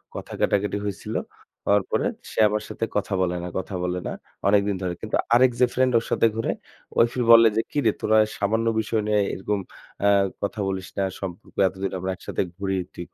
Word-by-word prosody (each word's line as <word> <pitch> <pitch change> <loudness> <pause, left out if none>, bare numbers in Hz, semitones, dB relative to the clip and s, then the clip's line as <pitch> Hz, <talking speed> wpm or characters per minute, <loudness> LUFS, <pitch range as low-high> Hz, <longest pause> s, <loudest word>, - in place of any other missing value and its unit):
কথা - - -7
কাটাকাটি 100 0 +1
হইছিল। 100 -2 -4 0.5
হওয়ার 100 0 +4
পরে - - +1 0.3
সে - - -4
আমার 105 0 -1
সাথে 115 - -2
কথা 105 0 -1
বলে 90 -1 +1
না, - - -4
কথা 95 +1 -4
বলে 90 0 -1
না - - -3 0.4
অনেকদিন 100 0 +3
ধরে। 90 -2 -1
কিন্তু 110 - -2 0.2
আরেক 125 +1 +6
যে 125 - +7
friend 130 0 +3
ওর 115 - -1
সাথে - - +4
ঘোরে, 115 - 0 0.5
ওই - - +7
ফির 125 - 0
বলে 115 0 +9
যে, - - +4
"কিরে 145 - +2
তোরা 110 0 +3 0.2
সামান্য 110 +3 0
বিষয় 110 0 0
নিয়ে 105 -1 +3
এরকম 100 +2 -2 0.5
আ - - +6 0.3
কথা 100 +1 -3
বলিস 95 -1 -3
না। 100 - +1 0.2
সম্পর্ক 90 -2 -7
এতদিন 95 +1 -4
আমরা 95 +1 -2
একসাথে - - -3 0.2
ঘুরি, 95 -1 -1 0.2
তুই 85 - -6
100 Hz, 195 wpm, -24 LUFS, 95-110 Hz, 0.5 s, বলে